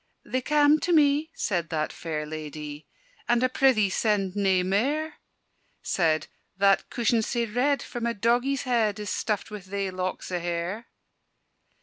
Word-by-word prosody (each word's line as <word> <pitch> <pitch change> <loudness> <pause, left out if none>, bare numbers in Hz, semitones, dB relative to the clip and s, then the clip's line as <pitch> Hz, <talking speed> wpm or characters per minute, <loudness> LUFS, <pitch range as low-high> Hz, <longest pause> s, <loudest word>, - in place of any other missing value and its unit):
"They 255 - -1
cam' 295 +2 +4
to 350 - -1
me," 300 -1 +4
said 175 -5 -1
that 155 -1 -2
fair 155 -2 -4
ladye; 150 -1 -7 0.4
"And 240 +1 +3
I - - +5
prithee 250 -7 +3
send 200 -3 0
nae 190 -3 +2
mair!" 280 +12 0 0.7
Said 155 -4 +1 0.3
"that 195 0 +3
cushion 235 -1 +1
sae 235 +2 -1
red, 255 +6 0
for 240 - -7
my 235 0 0
doggie's 240 +5 +1
head, 230 -5 +1
It 210 - -5
is 205 - -5
stuffed 210 -1 -2
wi' 210 - -5
thae 195 0 -4
locks 185 0 -4
o' 180 - -1
hair." 175 +6 -3
210 Hz, 155 wpm, -26 LUFS, 185-250 Hz, 0.7 s, I